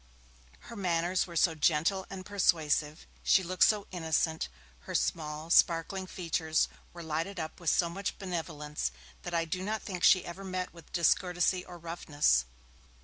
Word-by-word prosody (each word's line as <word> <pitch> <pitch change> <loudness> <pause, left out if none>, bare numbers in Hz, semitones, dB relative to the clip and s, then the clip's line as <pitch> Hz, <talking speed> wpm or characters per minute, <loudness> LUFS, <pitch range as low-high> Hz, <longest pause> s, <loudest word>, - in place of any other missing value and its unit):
Her 235 - -10
manners 180 -2 0
were 170 - -10
so 165 0 +4
gentle 165 +5 +1
and 190 -1 -7
persuasive, 160 -6 +1 0.2
she 190 - +4
looked 185 +1 +4
so 210 -2 +2
innocent, 160 - 0 0.3
her - - -7
small, 155 0 -1
sparkling 175 +3 +3
features 160 -3 0 0.2
were 170 -1 -9
lighted 165 +4 -3
up 160 -1 -5
with 170 -3 0
so 170 - +3
much 195 +4 -4
benevolence, 150 - -3 0.3
that - - -4
I 165 0 +1
do 180 +3 -3
not 215 +3 -2
think 180 -3 -5
she 185 -1 +6
ever 175 +3 -7
met 185 -1 -4
with 170 -3 -15
discourtesy 180 +1 +2
or 180 -1 -10
roughness. 150 - +1
170 Hz, 155 wpm, -31 LUFS, 160-185 Hz, 0.3 s, she